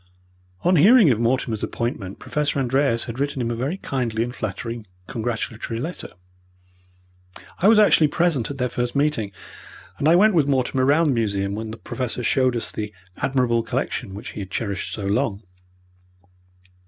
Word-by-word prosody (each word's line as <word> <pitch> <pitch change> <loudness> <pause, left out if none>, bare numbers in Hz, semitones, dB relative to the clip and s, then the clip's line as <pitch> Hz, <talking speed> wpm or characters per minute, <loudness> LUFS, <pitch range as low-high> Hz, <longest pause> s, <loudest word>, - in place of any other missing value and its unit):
On 180 0 +4
hearing 200 - +7
of 115 - +1
Mortimer's 120 -2 0
appointment 110 -5 -3
Professor 150 -1 -2
Andreas 130 -2 +1
had 120 +1 -7
written 140 -1 -1
him 120 -1 -1
a - - -2
very 135 +10 -2
kindly 120 - -2
and 120 +1 -5
flattering 115 0 -5 0.2
congratulatory 115 -1 -4
letter. 165 +8 -5 1.5
I 185 - +4
was 220 0 +7
actually 205 -7 +6
present 160 -5 +1
at 140 - -5
their 125 -1 0
first 120 +1 -3
meeting, 140 -8 +1 0.7
and 145 - +1
I 165 - +6
went 210 +4 +5
with 155 -5 +3
Mortimer 130 -1 +1
round 150 +3 +4
the - - +3
museum 100 -5 0
when 110 +1 -4
the 110 - -7
Professor 125 -1 -4
showed 130 +2 +2
us 115 - -2
the 105 -1 -5 0.3
admirable 125 -4 +1
collection 95 -3 -3
which 105 +4 -7
he - - -8
had 95 -2 -6
cherished 100 -3 -3
so 105 - -5
long. 105 0 0
125 Hz, 165 wpm, -23 LUFS, 110-145 Hz, 1.5 s, hearing